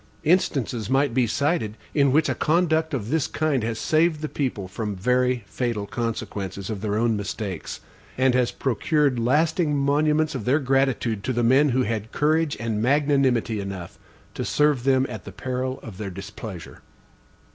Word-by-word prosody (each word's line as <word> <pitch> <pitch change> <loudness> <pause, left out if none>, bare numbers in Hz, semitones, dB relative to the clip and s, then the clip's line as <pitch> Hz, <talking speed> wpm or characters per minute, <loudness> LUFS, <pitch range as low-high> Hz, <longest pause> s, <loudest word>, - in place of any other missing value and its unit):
Instances 135 - +1
might 135 -1 +2
be 125 -1 +2
cited 130 -4 0 0.2
in 140 -3 +3
which 155 +3 +3
a - - +1
conduct 160 -1 +1
of 115 -2 -4
this 160 -3 +1
kind 150 -6 0
has 115 0 -2
saved 155 +3 +2
the 155 - -2
people 125 -11 -3
from 105 +2 -4
very 125 +4 +1
fatal 115 -5 -2
consequences 100 -4 -4
of 100 -3 -5
their 105 -1 -1
own 115 0 +2
mistakes, 100 -3 -5 0.4
and 130 0 +3
has 125 -1 +2
procured 140 +1 0
lasting 150 +5 +2
monuments 150 +2 +2
of 125 -6 -5
their 130 +4 +3
gratitude 135 -6 0
to 130 - -1
the 120 0 0
men 135 +5 +5
who 130 0 +2
had 110 -1 -3
courage 155 0 +1
and 110 -2 -2
magnanimity 135 -4 +2
enough 95 -3 -7 0.3
to - - -4
serve 150 -4 +2
them 130 -1 +3
at - - -7
the - - -9
peril 130 0 -3
of 100 -5 -9
their 105 -2 -4
displeasure. 95 -1 -9
130 Hz, 170 wpm, -24 LUFS, 110-145 Hz, 0.4 s, men